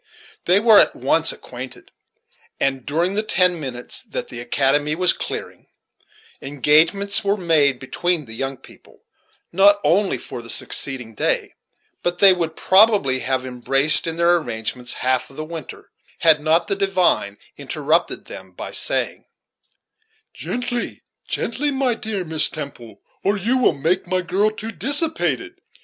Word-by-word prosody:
They 180 Hz, +3 st, +4 dB
were 220 Hz, -1 st, +6 dB
at -, -, +3 dB
once 155 Hz, +6 st, +2 dB
acquainted; 125 Hz, +1 st, -10 dB, 0.7 s
and, 135 Hz, -2 st, -1 dB
during 170 Hz, +6 st, -1 dB
the 210 Hz, -, 0 dB
ten 180 Hz, -5 st, +1 dB
minutes 125 Hz, -4 st, -4 dB
that -, -, -6 dB
the 120 Hz, -, -7 dB
"academy" 140 Hz, +5 st, 0 dB
was 180 Hz, +1 st, +4 dB
clearing, -, -, -7 dB, 0.7 s
engagements 155 Hz, +9 st, +3 dB
were 200 Hz, +1 st, 0 dB
made 155 Hz, -7 st, +2 dB
between 155 Hz, +5 st, -2 dB
the 110 Hz, -, -10 dB
young 135 Hz, +3 st, -4 dB
people, 135 Hz, -, -18 dB, 0.5 s
not 200 Hz, +3 st, +5 dB
only 195 Hz, -5 st, +1 dB
for 120 Hz, -, -8 dB
the 115 Hz, -, -10 dB
succeeding 125 Hz, -4 st, -1 dB
day, -, -, -1 dB, 0.5 s
but 175 Hz, 0 st, -2 dB
they 195 Hz, 0 st, +7 dB
would 165 Hz, -3 st, -3 dB
probably 190 Hz, -, +4 dB
have 130 Hz, 0 st, -1 dB
embraced 135 Hz, +5 st, +4 dB
in 165 Hz, -, -3 dB
their 170 Hz, +1 st, +3 dB
arrangements 120 Hz, -3 st, -3 dB
half 130 Hz, 0 st, -1 dB
of 135 Hz, -, -16 dB
the 155 Hz, -, -6 dB
winter, 165 Hz, 0 st, -9 dB, 0.3 s
had 160 Hz, -2 st, +5 dB
not 160 Hz, +2 st, +2 dB
the 200 Hz, -, 0 dB
divine 185 Hz, -, 0 dB, 0.2 s
interrupted 150 Hz, +3 st, -1 dB
them -, -, -12 dB
by -, -, -8 dB
saying: -, -, -2 dB, 1.1 s
"Gently, 245 Hz, -1 st, -4 dB, 0.2 s
gently, 270 Hz, +6 st, -2 dB
my 265 Hz, -3 st, 0 dB
dear 215 Hz, -4 st, -4 dB
Miss 160 Hz, -1 st, +1 dB
Temple, 140 Hz, -7 st, -9 dB, 0.2 s
or 200 Hz, +2 st, +1 dB
you 235 Hz, +7 st, 0 dB
will 250 Hz, -, +3 dB
make 165 Hz, +7 st, -1 dB
my 185 Hz, +1 st, 0 dB
girl 190 Hz, +4 st, 0 dB
too 215 Hz, +1 st, -6 dB
dissipated. 300 Hz, +6 st, -1 dB
165 Hz, 145 wpm, -20 LUFS, 135-195 Hz, 1.1 s, they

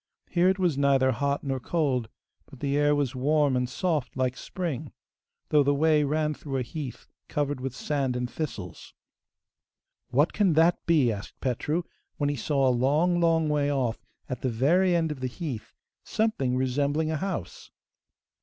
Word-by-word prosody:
Here 180 Hz, +1 st, +4 dB
it 190 Hz, -, +1 dB
was 175 Hz, -7 st, +1 dB
neither 135 Hz, -2 st, +4 dB
hot 140 Hz, +3 st, -1 dB
nor 135 Hz, -2 st, -2 dB
cold, 130 Hz, -5 st, 0 dB, 0.4 s
but 135 Hz, -, -14 dB
the 140 Hz, -1 st, -1 dB
air 145 Hz, 0 st, +3 dB
was 145 Hz, -3 st, 0 dB
warm 145 Hz, +1 st, +2 dB
and 125 Hz, -1 st, 0 dB
soft 155 Hz, -2 st, -1 dB
like 130 Hz, -1 st, 0 dB
spring, 155 Hz, -5 st, -4 dB, 0.6 s
though 150 Hz, -, +5 dB
the 145 Hz, 0 st, +2 dB
way 155 Hz, 0 st, +3 dB
ran 150 Hz, +1 st, 0 dB
through 140 Hz, -2 st, -5 dB
a 130 Hz, -, 0 dB
heath 140 Hz, 0 st, -7 dB, 0.2 s
covered 145 Hz, -2 st, -2 dB
with 130 Hz, -1 st, -4 dB
sand 135 Hz, -4 st, -1 dB
and 125 Hz, 0 st, -1 dB
thistles. 115 Hz, -, -6 dB, 1.1 s
'What 145 Hz, +6 st, +2 dB
can 200 Hz, -5 st, +3 dB
that 165 Hz, +3 st, +3 dB
be?' 150 Hz, -8 st, +4 dB
asked 100 Hz, -2 st, -7 dB
Petru, 145 Hz, +7 st, -1 dB, 0.3 s
when 145 Hz, -1 st, +1 dB
he -, -, -2 dB
saw 135 Hz, +2 st, +1 dB
a -, -, +4 dB
long, 150 Hz, +8 st, +2 dB
long 165 Hz, -2 st, +3 dB
way 145 Hz, -1 st, +1 dB
off, 125 Hz, -5 st, -1 dB, 0.2 s
at 125 Hz, -, -5 dB
the 130 Hz, -, 0 dB
very 170 Hz, +10 st, +3 dB
end 165 Hz, -2 st, +1 dB
of 150 Hz, -, -6 dB
the 130 Hz, -, -2 dB
heath, 130 Hz, -4 st, -6 dB, 0.3 s
something 175 Hz, -, 0 dB
resembling 145 Hz, +4 st, 0 dB
a 155 Hz, -, -1 dB
house. 170 Hz, -, -5 dB
145 Hz, 175 wpm, -27 LUFS, 130-160 Hz, 1.1 s, though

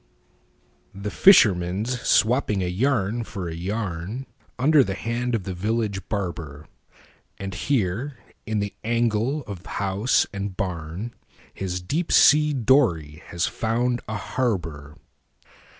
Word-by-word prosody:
THE 100 Hz, +1 st, -5 dB
FISHERMAN'S 105 Hz, -, +4 dB
swapping 110 Hz, -4 st, +2 dB
a -, -, -1 dB
yarn 115 Hz, +2 st, 0 dB
for 95 Hz, -5 st, -6 dB
a 80 Hz, -, -5 dB
yarnUnder 110 Hz, -, -1 dB
the 95 Hz, -5 st, -3 dB
hand 120 Hz, +2 st, -2 dB
of 105 Hz, -, -2 dB
the 95 Hz, -, -4 dB
village 100 Hz, 0 st, -2 dB
barber, 85 Hz, -7 st, -4 dB, 0.7 s
And 95 Hz, -1 st, -5 dB
here 120 Hz, -, -1 dB, 0.3 s
in 110 Hz, -1 st, 0 dB
the 100 Hz, 0 st, -3 dB
angle 120 Hz, +5 st, 0 dB
of 100 Hz, -5 st, -8 dB
house 100 Hz, +5 st, +1 dB
and 100 Hz, -2 st, -4 dB
barnHis 90 Hz, +1 st, -6 dB
deep 165 Hz, -, -1 dB
sea 150 Hz, +1 st, +6 dB
dory 110 Hz, -, +2 dB
has 85 Hz, 0 st, -1 dB
found 120 Hz, +2 st, -1 dB
a 110 Hz, -2 st, -3 dB
harbor. 85 Hz, -, -3 dB
105 Hz, 115 wpm, -24 LUFS, 90-120 Hz, 0.7 s, sea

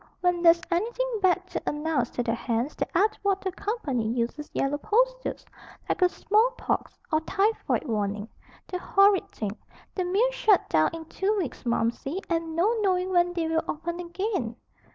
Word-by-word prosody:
When 355 Hz, -1 st, +2 dB
there's 335 Hz, 0 st, +6 dB
anything 470 Hz, +6 st, 0 dB
bad 370 Hz, -1 st, +3 dB
to -, -, -2 dB
announce 295 Hz, -5 st, 0 dB
to 245 Hz, -, 0 dB
the 230 Hz, -, 0 dB
hands 235 Hz, +4 st, -2 dB
the -, -, -2 dB
Atwater 395 Hz, -1 st, +1 dB
Company 355 Hz, -, -2 dB
uses 240 Hz, +6 st, -2 dB
yellow 285 Hz, +2 st, 0 dB
posters, -, -, 0 dB, 0.4 s
like -, -, -1 dB
a 360 Hz, -, +6 dB
small 445 Hz, +7 st, +2 dB
pox, -, -, -2 dB, 0.2 s
or 310 Hz, -, +3 dB
typhoid 405 Hz, +6 st, 0 dB
warning. 210 Hz, -3 st, -2 dB, 0.4 s
The 365 Hz, -, -4 dB
horrid 395 Hz, +1 st, +4 dB
thing! 215 Hz, -, -4 dB, 0.4 s
The 370 Hz, -, -1 dB
mills 430 Hz, +8 st, +2 dB
shut 420 Hz, -6 st, +3 dB
down 155 Hz, -1 st, +4 dB
in 325 Hz, -1 st, -7 dB
two 390 Hz, +6 st, -1 dB
weeks, 320 Hz, -8 st, -4 dB
Momsey, 235 Hz, +8 st, 0 dB
and 330 Hz, -1 st, -1 dB
no 400 Hz, +8 st, +3 dB
knowing 370 Hz, -2 st, +1 dB
when 350 Hz, -1 st, +3 dB
they 335 Hz, -2 st, -1 dB
will 320 Hz, 0 st, +1 dB
open 340 Hz, +3 st, -4 dB
again." 350 Hz, -, -2 dB
350 Hz, 165 wpm, -27 LUFS, 290-400 Hz, 0.4 s, there's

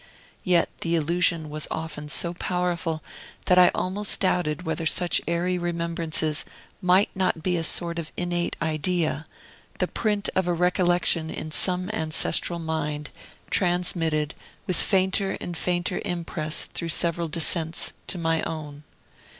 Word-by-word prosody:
Yet 180 Hz, -2 st, +3 dB
the 170 Hz, 0 st, 0 dB
illusion 165 Hz, 0 st, +1 dB
was 155 Hz, 0 st, -1 dB
often 160 Hz, -2 st, -5 dB
so 170 Hz, +3 st, +1 dB
powerful, 175 Hz, -3 st, -2 dB, 0.4 s
that 180 Hz, 0 st, +5 dB
I 180 Hz, -, +8 dB
almost 195 Hz, +2 st, +1 dB
doubted 180 Hz, -3 st, +1 dB
whether 160 Hz, -1 st, -1 dB
such 175 Hz, 0 st, +2 dB
airy 175 Hz, +2 st, 0 dB
remembrances 170 Hz, -3 st, -1 dB, 0.4 s
might 185 Hz, +3 st, +4 dB
not 185 Hz, -4 st, 0 dB
be 180 Hz, -1 st, +1 dB
a 165 Hz, -, -1 dB
sort 170 Hz, +1 st, +1 dB
of 160 Hz, -2 st, -6 dB
innate 175 Hz, -1 st, -1 dB
idea, 160 Hz, -1 st, -1 dB, 0.5 s
the -, -, +1 dB
print 210 Hz, -2 st, -1 dB
of 185 Hz, -1 st, +1 dB
a 175 Hz, -, +2 dB
recollection 175 Hz, -2 st, +2 dB
in 155 Hz, -, -5 dB
some 180 Hz, +4 st, +2 dB
ancestral 160 Hz, -1 st, +1 dB
mind, 150 Hz, -2 st, -3 dB, 0.4 s
transmitted, 165 Hz, -4 st, +1 dB, 0.3 s
with 185 Hz, -4 st, 0 dB
fainter 190 Hz, 0 st, +2 dB
and 175 Hz, -, -5 dB
fainter 175 Hz, +1 st, -1 dB
impress 170 Hz, -4 st, -1 dB
through 170 Hz, -, -4 dB
several 170 Hz, +1 st, +1 dB
descents, 165 Hz, +1 st, +1 dB, 0.2 s
to 185 Hz, -, -1 dB
my 165 Hz, -1 st, +1 dB
own. 150 Hz, -2 st, -5 dB
170 Hz, 135 wpm, -25 LUFS, 160-180 Hz, 0.5 s, I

